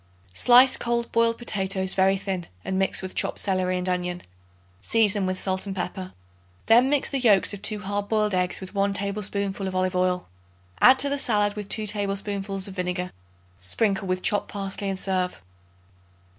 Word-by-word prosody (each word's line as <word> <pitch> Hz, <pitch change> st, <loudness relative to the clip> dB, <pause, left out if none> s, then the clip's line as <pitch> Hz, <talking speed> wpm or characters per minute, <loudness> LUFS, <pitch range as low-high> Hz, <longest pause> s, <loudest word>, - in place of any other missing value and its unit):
Slice 250 Hz, -, +6 dB
cold 235 Hz, 0 st, -1 dB
boiled 230 Hz, 0 st, +2 dB
potatoes 190 Hz, -4 st, -1 dB
very 195 Hz, 0 st, +3 dB
thin 190 Hz, -3 st, -4 dB, 0.2 s
and 190 Hz, 0 st, -1 dB
mix 190 Hz, 0 st, 0 dB
with 185 Hz, -, -6 dB
chopped -, -, 0 dB
celery 185 Hz, -2 st, 0 dB
and 180 Hz, 0 st, -3 dB
onion; 180 Hz, -1 st, -2 dB, 0.6 s
season 205 Hz, -, +2 dB
with 185 Hz, 0 st, -2 dB
salt 190 Hz, +1 st, -2 dB
and 195 Hz, -, -4 dB
pepper. 185 Hz, 0 st, -5 dB, 0.5 s
Then 240 Hz, +4 st, +5 dB
mix 290 Hz, -1 st, +1 dB
the 275 Hz, -, -2 dB
yolks 210 Hz, -5 st, +3 dB
of 200 Hz, -, -8 dB
2 210 Hz, 0 st, -1 dB
hard 205 Hz, +1 st, -3 dB
boiled 215 Hz, -2 st, +1 dB
eggs 180 Hz, 0 st, 0 dB
with 190 Hz, 0 st, -9 dB
1 200 Hz, 0 st, +1 dB
tablespoonful 200 Hz, -1 st, -2 dB
of 185 Hz, -, -5 dB
olive 185 Hz, 0 st, 0 dB
oil. 180 Hz, 0 st, 0 dB, 0.5 s
Add 260 Hz, +1 st, +7 dB
to 280 Hz, +2 st, +1 dB
the 285 Hz, 0 st, -2 dB
salad 205 Hz, -5 st, +1 dB
with 205 Hz, -1 st, -7 dB
2 215 Hz, -, -2 dB
tablespoonfuls 200 Hz, -1 st, -1 dB
of 195 Hz, -, -8 dB
vinegar. 180 Hz, -1 st, -3 dB, 0.5 s
Sprinkle 195 Hz, -, 0 dB
with 185 Hz, 0 st, -2 dB
chopped 205 Hz, -, +1 dB
parsley 195 Hz, 0 st, -4 dB
and 195 Hz, -, -3 dB
serve. 185 Hz, -, -1 dB
195 Hz, 175 wpm, -25 LUFS, 185-210 Hz, 0.6 s, Add